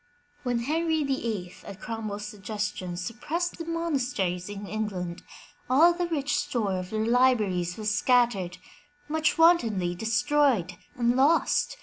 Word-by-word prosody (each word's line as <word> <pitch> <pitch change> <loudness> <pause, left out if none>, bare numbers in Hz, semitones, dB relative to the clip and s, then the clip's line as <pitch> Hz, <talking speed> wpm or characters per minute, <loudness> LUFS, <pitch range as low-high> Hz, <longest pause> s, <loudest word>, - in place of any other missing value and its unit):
When 245 -2 -1
Henry 320 +4 0
VIII, 225 -10 -2
at 200 0 -10
CromwelFs 215 -3 -5
suggestion, 205 -3 -4
suppressed 300 - -3
the 330 - -5
monasteries 250 - -1
in 205 0 -6
England, 190 -5 -4 0.5
all 320 +7 +6
the 350 0 -2
rich 290 -4 -1
store 205 -6 -1
of 180 0 -6
their 220 +1 -1
libraries 215 -8 +2
was 215 -1 -1
scattered, 220 -8 +2 0.5
much 310 +1 +1
wantonly 230 - +4
destroyed 225 - +1 0.2
and 240 0 +1
lost. 315 - +2
230 Hz, 125 wpm, -27 LUFS, 195-290 Hz, 0.5 s, all